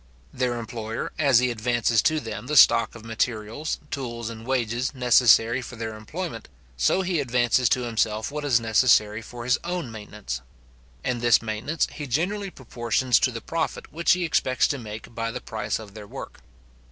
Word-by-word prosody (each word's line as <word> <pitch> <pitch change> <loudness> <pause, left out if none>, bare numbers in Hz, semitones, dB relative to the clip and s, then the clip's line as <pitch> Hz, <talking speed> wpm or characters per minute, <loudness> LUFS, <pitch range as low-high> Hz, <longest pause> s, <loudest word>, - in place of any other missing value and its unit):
Their 125 -1 -1
employer, 115 -1 -5
as 140 -5 +5
he 125 +1 +3
advances 115 -1 +1
to 155 0 +2
them 115 -1 -6
the 150 - +1
stock 115 -1 +6
of 115 -1 -11
materials, 115 +5 -2
tools, 120 -4 -4
and 115 +1 -10
wages, 125 0 -1
necessary 120 -1 +5
for 125 - -9
their 110 -1 -5
employment, 115 +3 -6 0.3
so 65 - +2
he 175 -3 0
advances 125 -2 +2
to 125 - +2
himself 110 -1 -1
what 150 0 -4
is 130 -5 +3
necessary 110 -1 +3
for 120 +1 -9
his 125 +1 +2
own 175 -7 -3
maintenance; 105 - -6 0.6
and 125 -2 -1
this 120 -1 +5
maintenance 115 +9 -1
he 150 - -6
generally 190 - -1
proportions 125 -3 0
to - - +2
the 115 -2 -6
profit 165 -1 -3
which 170 +2 +3
he 180 0 0
expects 130 -6 +2
to 140 - -2
make 110 0 -8
by 115 0 -2
the 125 +2 -5
price 110 -2 -3
of 105 -3 -11
their 105 -1 -10
work. - - -9
120 Hz, 175 wpm, -25 LUFS, 110-130 Hz, 0.6 s, stock